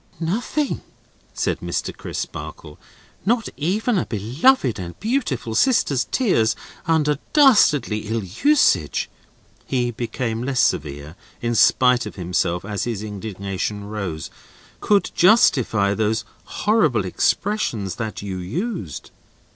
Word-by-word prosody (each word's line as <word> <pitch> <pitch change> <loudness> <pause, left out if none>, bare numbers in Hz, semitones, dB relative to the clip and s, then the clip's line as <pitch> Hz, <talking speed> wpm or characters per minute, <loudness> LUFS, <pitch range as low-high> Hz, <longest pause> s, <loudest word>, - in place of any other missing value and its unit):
"Nothing," 230 - -1 0.5
said - - -1
Mr. - - -3
Crisparkle, - - -7 0.4
"not 230 +2 +1
even 205 - 0
a - - -3
beloved 125 - +2
and 85 -1 -7
beautiful 210 - -1
sister's 140 - +2
tears 115 - +1 0.3
under 150 -3 +2
dastardly 150 - +4
ill 110 0 -1
usage;" 285 - +2 0.6
he 125 -2 0
became 115 -1 -3
less 130 0 -1
severe, 75 - 0 0.2
in 120 0 -1
spite 125 0 +4
of - - -9
himself, 90 -1 -1
as 100 -2 -3
his 115 -4 -3
indignation 100 -1 -4
rose; 100 -7 -5 0.5
"could 205 -1 +2
justify 125 - +4
those 110 +1 0 0.2
horrible 160 - +1
expressions 110 - -1
that 110 -2 -5
you 95 -2 -4
used." 110 - -4
120 Hz, 110 wpm, -22 LUFS, -, 0.6 s, dastardly